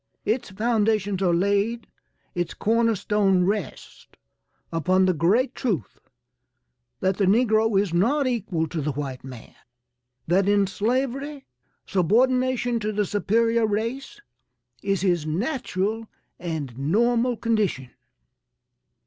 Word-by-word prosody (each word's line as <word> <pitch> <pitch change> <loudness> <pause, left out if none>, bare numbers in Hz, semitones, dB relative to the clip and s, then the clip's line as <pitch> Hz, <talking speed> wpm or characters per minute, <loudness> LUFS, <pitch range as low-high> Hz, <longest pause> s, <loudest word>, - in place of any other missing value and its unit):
Its 225 +2 -1
foundations 210 -2 0
are 180 -2 +3
laid, 200 +6 +1 0.5
its 175 -1 -3
corner 230 +1 +2
stone 195 -2 +2
rests 200 -1 -4 0.7
upon 185 +3 +2
the 185 - +3
great 210 - +2
truth 185 - -3 1.0
that 190 0 +1
the 200 - +2
negro 220 -1 +3
is 195 -4 -1
not 255 +12 +2
equal 210 -10 -1
to 160 0 -4
the 150 0 -2
white 135 -2 -5
man. 130 -3 -11 0.7
That 190 +4 +2
in 205 -1 +4
slavery, 265 +7 -2 0.4
subordination 245 +5 +2
to 215 0 -2
the 210 0 0
superior 225 +3 +1
race, 230 - -3 0.6
is 195 -3 0
his 175 -5 +1
natural 220 - -2 0.3
and 160 -8 -4
normal 235 - +1
condition. 210 - -1
205 Hz, 115 wpm, -24 LUFS, 180-230 Hz, 1.0 s, in